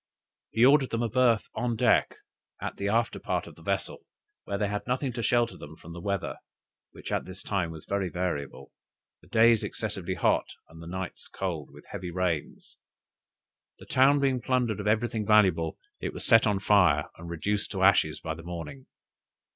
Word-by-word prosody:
He 115 +2 +4
ordered 135 -1 +5
them 115 +1 -1
a 115 - 0
berth 120 -2 +3
on 120 +1 -1
deck, - - +3 0.4
at - - -5
the 100 - -2
after 115 +3 +1
part - - -2
of - - -11
the - - -18
vessel, - - -2 0.5
where 100 - -2
they 105 0 0
had 105 +2 -4
nothing 125 +1 -1
to 120 - -3
shelter 120 +1 +1
them 75 +2 -10
from 85 +1 -12
the 85 - -8
weather, 100 0 -2 0.5
which - - -9
at - - -1
this 95 0 -10
time 95 -5 -1
was 80 -2 -9
very 100 -2 -1
variable 85 -6 -4 0.5
the - - -20
days 115 0 +4
excessively 95 -4 -4
hot, - - +2 0.2
and 80 0 -14
the 85 - -9
nights 95 +1 -6
cold, 85 -7 -4
with 75 +1 -15
heavy 90 -3 -5
rains. 85 -3 -3 1.0
The - - -13
town 140 +2 +4
being 135 -3 +1
plundered 125 -4 0
of 105 - -3
everything 110 0 +1
valuable, 95 -7 +3 0.2
it - - -4
was - - -6
set 115 0 +6
on 105 -1 +2
fire, 85 -8 +4
and 85 0 -8
reduced 100 +5 -2
to 95 -1 -1
ashes 90 -5 +4
by 80 - -4
the 80 - -10
morning. 90 - -7
100 Hz, 185 wpm, -28 LUFS, 85-115 Hz, 1.0 s, set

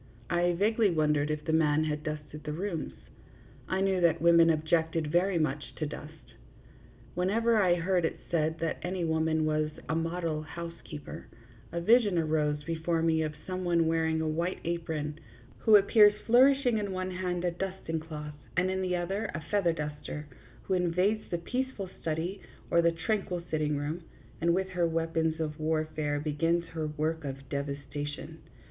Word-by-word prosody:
I 175 +1 +3
vaguely 215 +4 +3
wondered 150 -3 +2
if 150 -1 -3
the 160 - 0
man 155 -1 +3
had 150 -1 -2
dusted 150 -1 -6
the 150 0 -3
rooms. 165 - -3 0.7
I 190 0 0
knew 190 -2 +2
that 170 -2 +4
women 170 0 +6
objected 160 0 +1
very 180 +2 +2
much 150 -2 -2
to 155 - -2
dust. 150 +1 -9 0.8
Whenever 220 +5 +2
I 180 -3 +4
heard 175 +1 +1
it 160 - -1
said 160 -1 +1
that 165 - -1
any 180 -1 -2
woman 160 -1 +1
was 155 0 +1
" - - -18
a - - +1
model 165 -1 -1
housekeeper 165 -1 -8 0.2
" 115 -2 -24
a 170 - -2
vision 210 0 +4
arose 150 -2 +1
before 165 +1 -1
me 160 -1 +3
of 155 -1 -2
some 185 0 -3
one 170 -2 +2
wearing 160 0 +1
a 160 - -1
white 170 +4 -1
apron, 160 -3 -3 0.4
who 220 - +6
appears 205 +1 +7
flourishing 250 -1 +5
in 200 -2 -3
one 185 0 -3
hand 180 -1 -2
a 175 - +2
dusting 180 -2 -3
cloth 150 -2 -7 0.2
and 185 +1 +3
in 190 0 -1
the 180 -1 0
other 195 +5 -2
a 170 - -3
feather 200 -5 +3
duster; 150 -1 -5 0.4
who 190 - -2
invades 185 +4 +1
the 175 - -1
peaceful 245 +2 -3
study 165 +5 -2 0.3
or 170 - +5
the 170 0 +4
tranquil 175 +1 -2
sitting 150 -2 0
room, 150 +4 -3 0.4
and 170 +1 +3
with 190 0 -1
her 175 -2 +1
weapons 165 -1 0
of 155 -1 -3
warfare 155 -1 -1
begins 165 +3 0
her 160 -1 -3
work 155 +1 -2
of 135 -1 -6
devastation. 140 0 -5
165 Hz, 170 wpm, -30 LUFS, 155-180 Hz, 0.8 s, appears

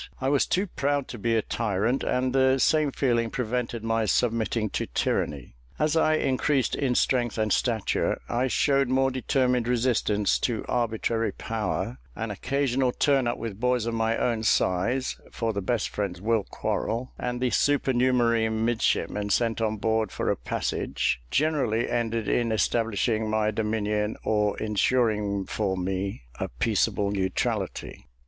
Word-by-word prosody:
I 130 - 0
was 140 -1 +2
too 190 +3 +1
proud 145 -6 -1
to 120 - -7
be 115 +2 +1
a 110 - +1
tyrant, 115 +3 -1
and 130 0 0
the 130 0 +4
same 150 +1 +3
feeling 120 -4 +1
prevented 120 -1 -3
my 115 0 +1
submitting 110 0 0
to - - -2
tyranny. 70 -5 -2 0.2
As 155 +1 +1
I 155 -1 +3
increased 135 -1 +1
in 130 -3 0
strength 120 -3 +1
and 110 -2 +1
stature, 115 -5 0
I 125 +2 0
showed 140 +1 +2
more 135 +1 +2
determined 125 -2 +1
resistance 115 -4 +1
to 115 -3 -1
arbitrary 115 -1 0
power: 105 - -3 0.2
an 115 -1 -4
occasional 135 +3 0
turn 135 -1 +2
up 120 - -1
with 110 -3 -6
boys 125 -1 +1
of 115 - -2
my 115 0 +1
own 115 -2 0
size 110 +5 +1
(for 115 -1 -2
the 100 - -2
best 115 +3 -1
friends 100 -4 -3
will 110 +1 +1
quarrel), 115 +4 -3
and 125 0 -3
the 125 -1 0
supernumerary 125 -5 +2
midshipmen 110 -2 0
sent 115 +2 +1
on 110 -1 0
board 110 -1 0
for - - -1
a - - +1
passage, - - -2
generally 135 - +1
ended 115 -2 -1
in 120 -2 +1
establishing 110 0 0
my 110 0 +1
dominion 105 0 -1
or 105 -1 +1
insuring 105 -2 +1
for 95 -2 -2
me 95 - -3 0.2
a - - -1
peaceable 100 +10 0
neutrality. 95 -2 -2
115 Hz, 150 wpm, -26 LUFS, 105-125 Hz, 0.2 s, the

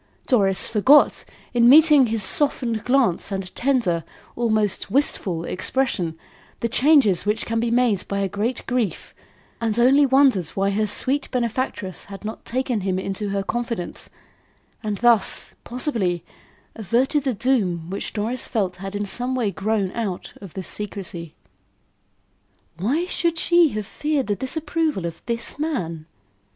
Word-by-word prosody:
Doris 195 -6 +2
forgot, 260 +7 +4 0.3
in 240 -1 +5
meeting 300 -2 +7
his 220 -2 0
softened 235 -2 0
glance 245 -8 +1
and 190 -2 -4
tender, 235 -11 0 0.3
almost 215 -4 0
wistful, 185 - +1
expression, 180 -6 -1 0.4
the 235 - 0
changes 250 - +4
which 210 +2 -1
can 230 0 -1
be 235 +1 0
made 235 -5 +1
by 200 - -2
a 195 - +1
great 210 +6 -3
grief, 245 -7 -2 0.5
and 225 -1 0
only 270 +4 +5
wondered 265 - +3
why 195 0 +1
her 215 +2 0
sweet 265 +7 0
benefactress 235 -6 -3
had 200 +1 -10
not 220 - -6
taken 250 -3 -1
him 190 -1 -1
into 195 +2 -3
her 195 0 -1
confidence 230 -3 -4 0.7
and 210 -2 -3
thus, 235 -3 +2
possibly, 225 - -2 0.5
averted 240 - +1
the 260 -4 -1
doom 195 -9 0
which 195 - -4
Doris 225 +4 -2
felt 190 -5 -1
had 195 +1 -7
in 205 0 -2
some 245 +6 -2
way 230 -6 0
grown 200 -1 -1
out 205 -6 -4
of 195 -5 -11
this 190 -2 -4
secrecy. 180 -6 -5 1.4
"Why 275 - 0
should 340 -2 -1
she 345 -1 +4
have 210 - -3
feared 295 +4 -2
the 205 - -1
disapproval 295 - -2
of 165 -1 -6
this 235 +3 -3
man?" 170 - -3
225 Hz, 145 wpm, -22 LUFS, 195-260 Hz, 1.4 s, meeting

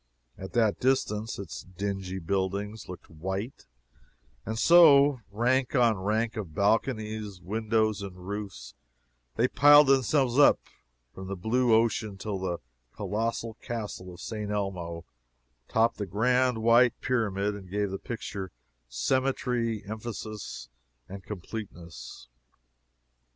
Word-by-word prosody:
At 95 - -9
that 110 -4 +2
distance 115 -4 0
its 95 -4 -7
dingy 95 0 -4
buildings 100 +4 -3
looked 90 - -9
white 95 - -5 0.8
and 110 0 -3
so, 145 -3 +6
rank 125 +6 +1
on 120 -3 +4
rank 110 +4 0
of 95 -9 -6
balconies, 110 -2 0
windows 110 +2 0
and 100 -2 -7
roofs, 100 -1 -6 0.6
they 120 - +3
piled 145 +3 +7
themselves 135 -1 +3
up 145 - +7 0.5
from 95 0 -8
the 95 - -4
blue 115 +6 +1
ocean 110 -3 +1
till 100 0 -4
the 90 -2 -2 0.4
colossal 110 +3 -2
castle 105 -5 -5
of 85 - -12
St. 105 0 -5
Elmo 90 -5 -3 0.6
topped 115 +1 +2
the 105 - -4
grand 125 +3 +1
white 120 +1 +5
pyramid 105 -5 0
and 100 -3 -10
gave 100 0 -1
the 95 - -4
picture 100 -5 -6 0.4
symmetry, 120 - 0
emphasis 110 - -6 0.4
and 95 0 -9
completeness. 85 - -8
105 Hz, 120 wpm, -28 LUFS, 95-120 Hz, 0.8 s, piled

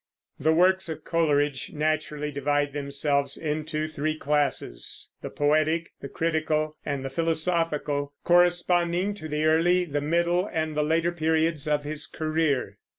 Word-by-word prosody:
The 155 +3 +3
works 185 +2 +3
of 155 -1 -6
Coleridge 145 -4 0
naturally 150 -1 -1
divide 145 0 0
themselves 140 0 -1
into 155 0 -2
three 155 0 -2
classes, 145 -2 -1
the - - -5
poetic, 155 +3 +1
the 140 - -6
critical, 155 -1 -1
and 140 -2 -3
the - - -2
philosophical, 160 -3 0
corresponding 175 +2 +3
to 180 -6 -8
the 150 0 -1
early, 175 +3 +3
the 145 -3 -2
middle, 170 +5 +1
and 160 -2 -2
the 150 - +2
later 165 +3 +1
periods 160 -2 0
of 150 -1 +1
his 150 0 -2
career. 155 -10 -1
155 Hz, 140 wpm, -26 LUFS, 145-165 Hz, -, The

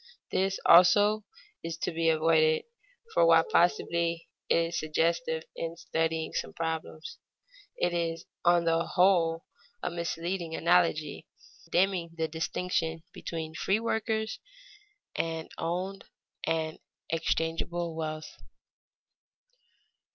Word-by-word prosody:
This, 195 +1 0
also, 205 +5 +6 0.4
is 165 0 -4
to - - -2
be 165 0 +1
avoided, 155 0 +3 0.5
for - - +4
while 165 -1 +6
possibly 170 0 +1 0.2
it - - +4
is 165 0 0
suggestive 160 +1 0
in 165 0 -4
studying 160 -1 -1
some - - -3
problems, 160 -1 -4 0.6
it 175 0 +1
is 165 -1 -2 0.2
on 175 -1 +4
the 165 0 +2
whole 170 -3 +2 0.4
a 180 - -1
misleading 170 0 -3
analogy, 165 -3 +1 0.4
dimming 175 -2 +1
the 160 0 0
distinction 165 0 -2
between 160 -1 -5
free 195 +5 +1
workers 220 -1 -1 0.8
and 165 -1 -3
owned 185 +4 -3 0.4
and 160 -1 -1 0.3
exchangeable 165 +1 -1
wealth. 155 -1 -5
165 Hz, 105 wpm, -29 LUFS, 160-175 Hz, 0.8 s, also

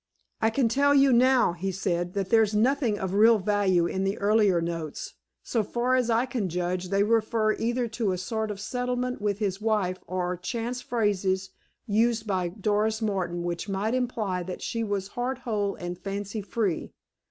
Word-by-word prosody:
"I 220 - +4
can 235 +2 +2
tell 280 +5 +3
you 275 -2 +5
now," 250 -5 +4
he 190 +3 -3
said, 175 -1 -2
"that 195 -2 -2
there's 220 -2 +4
nothing 245 -1 +2
of 190 -1 -3
real 220 +3 +6
value 195 -3 +2
in 190 +2 -1
the 195 +2 -1
earlier 205 -3 +3
notes. 165 -2 -4 0.3
So 230 - 0
far 240 +4 -1
as 250 -2 +2
I 230 +2 +3
can 240 -7 -2
judge, 180 +1 -2
they 200 +1 +3
refer 220 0 +2
either 240 +2 -1
to 220 -3 -1
a 185 - -1
sort 220 +4 -3
of 205 -1 -5
settlement 250 +2 -2
with 205 -1 0
his 200 -2 -2
wife 210 -5 0
or 180 0 -2
chance 235 +6 -3
phrases 195 -5 0 0.3
used 225 +1 +1
by 185 -4 0
Doris 210 +3 0
Martin 185 -6 -2
which 175 +3 -3
might 200 +4 -1
imply 225 -7 -1
that 180 +1 -6
she 230 -1 -2
was 200 -2 -2
heart 245 +3 -2
whole 210 -5 -2
and 175 0 -6
fancy 200 +2 -4
free. 205 -4 -2
210 Hz, 180 wpm, -27 LUFS, 185-230 Hz, 0.3 s, real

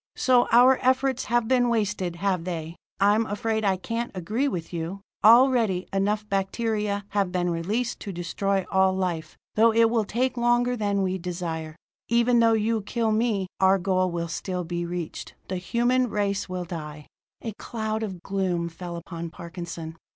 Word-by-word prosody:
"So 250 -2 +4
our 250 +3 +6
efforts 260 0 +1
have 240 0 +1
been 245 -1 +3
wasted, 205 -6 -1
have 185 -1 0
they? 165 -2 -5 0.2
I'm 210 +3 +3
afraid 220 +2 -1
I 195 -2 +2
can't 230 +5 -3
agree 215 +10 -1
with 180 -9 -4
you. 170 +4 -4 0.2
Already, 230 -5 +5
enough 205 +2 0
bacteria 205 +1 -1
have 200 -3 0
been 175 -1 0
released 210 +9 -2
to 200 - -6
destroy 190 +2 -1
all 190 0 +4
life, 170 -4 -3 0.2
though 225 +1 +5
it 225 0 +4
will 225 -3 +1
take 250 +4 -1
longer 240 +1 +2
than 205 -3 0
we 190 0 -1
desire. 165 -3 -4 0.3
Even 235 +1 +4
though 230 -1 +5
you 220 0 +1
kill 225 +2 -1
me, 215 -3 +1
our 190 0 +5
goal 185 0 +1
will 170 -1 -3
still 180 +2 -3
be 175 0 -3
reached. 175 -2 -5
The 185 - -2
human 240 +6 +1
race 200 -2 -1
will 180 -1 -3
die!" 150 -3 -7 0.4
A 225 - -4
cloud 220 -2 -3
of 190 -5 -5
gloom 185 -3 -1
fell 170 +1 -7
upon 170 0 -6
Parkinson. 170 -1 -7
200 Hz, 165 wpm, -25 LUFS, 175-230 Hz, 0.4 s, our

